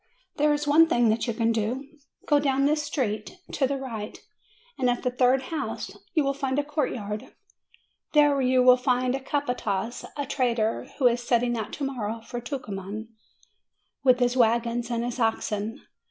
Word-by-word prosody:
There 300 +1 +3
is 295 0 0
one 320 +3 +6
thing 240 -7 +3
that 225 +3 0
you 235 - 0
can 230 -1 +2
do. 230 +5 -2 0.4
Go 295 -1 +4
down 275 -1 +1
this 300 +1 +2
street, 255 - -3
to 270 - +1
the 280 +1 -2
right, 230 -5 -6 0.6
and 255 -2 +2
at 245 - -1
the 250 - +1
third 255 +1 +3
house 310 - -4 0.2
you 310 - +4
will 275 0 +1
find 270 -1 -2
a 290 - +2
courtyard; 245 -8 -3 0.8
there 290 -2 +5
you 255 0 +3
will 250 0 +7
find 250 0 +1
a 270 - -1
capataz, 245 -6 -2
a 285 - -2
trader, 235 -5 0
who 270 - 0
is 245 0 +4
setting 240 0 +1
out 220 -2 -4
to 290 - -5
morrow 230 -5 -3
for 240 +2 -7
Tucuman, 215 -4 -6 0.9
with 255 -2 +5
his 245 0 +2
wagons 235 0 +2
and 235 -1 -1
his 245 +1 -4
oxen. 225 -1 -1
250 Hz, 175 wpm, -26 LUFS, 230-275 Hz, 0.9 s, will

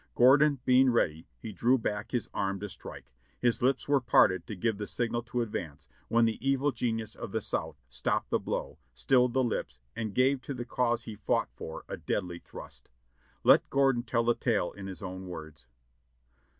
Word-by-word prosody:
Gordon 140 +4 +6
being 130 +1 +5
ready, 80 -9 0
he 110 - -7
drew 120 +7 +3
back 105 -3 -3
his 120 -5 -2
arm 100 -1 -1
to 105 - -4
strike: - - -10 0.3
his 120 -2 +1
lips 130 +2 +1
were 140 -1 +3
parted 95 -6 +4
to 105 - -5
give 105 +2 -1
the 105 - -3
signal 120 -1 -1
to 120 0 -1
advance, 80 -10 -6 0.2
when 115 0 +4
that 115 -1 -1
evil 135 +2 +2
genius 115 -3 -2
of - - -7
the - - 0
South - - -3
stopped 65 +2 -1
the - - +2
blow, - - -4 0.2
stilled 125 - +3
the 130 - +3
lips, 65 - -3 0.2
and 110 -3 -4
gave 130 +1 +3
to 140 - -5
the 120 -1 -5
cause 120 -1 0
he 110 - -7
fought 105 - 0
for 80 - -7
a - - -5
deadly 90 -3 -3
thrust. - - -11 0.5
Let - - +6
Gordon 135 -3 +3
tell 115 -1 0
the 120 +1 +3
tale 110 -7 0
in 100 -1 -8
his 95 +1 -8
own 95 0 -6
words. 80 -6 -9
115 Hz, 190 wpm, -30 LUFS, 95-125 Hz, 0.5 s, Gordon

